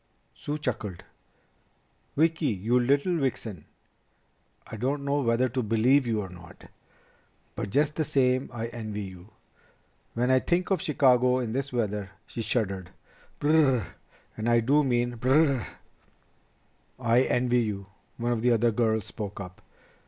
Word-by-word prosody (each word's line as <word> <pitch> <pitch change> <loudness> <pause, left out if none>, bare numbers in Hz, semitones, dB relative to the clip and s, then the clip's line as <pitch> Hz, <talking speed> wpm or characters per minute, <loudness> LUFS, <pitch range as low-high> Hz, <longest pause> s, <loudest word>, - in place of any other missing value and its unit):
Sue 145 +1 -4
chuckled. 110 - -4 1.1
"Vicki, 160 0 +2
you 110 +4 +1
little 140 +8 +2
vixen, 115 - -3 1.0
I - - -8
don't 140 +5 -2
know 140 +1 +1
whether 120 0 +2
to 130 +2 -1
believe 120 +5 +3
you 110 -2 0
or 95 - -6
not. 85 -3 -14 0.8
But - - -4
just 150 +6 +1
the 160 - +2
same 130 -3 +1
I 115 -1 -4
envy 110 -3 -5
you. 95 0 -10 0.9
When 125 +2 +1
I 130 - +5
think 175 +7 0
of 185 -5 +2
Chicago 125 -4 +3
in 120 -3 -2
this 135 +2 -2
weather 105 -5 -2
..." - - -40
She 115 - -6
shuddered. 95 -6 -1 0.5
"B 145 - 0
r - - +5
r 160 - +6
r - - +2
r! 110 - -5 0.5
And 110 +2 -2
I 120 0 +5
do 140 +6 +3
mean 120 -2 0
B 125 +3 -2
r 135 - +5
r 155 -4 +4
r!" 120 - -6 1.3
"I 120 0 +3
envy 125 -1 +2
you," 100 -3 -3 0.3
one 120 0 -1
of 115 -2 0
the 120 +1 +4
other 115 +1 +3
girls 110 -2 +1
spoke 105 -3 -6
up. 90 -2 -9
120 Hz, 165 wpm, -27 LUFS, 110-135 Hz, 1.3 s, r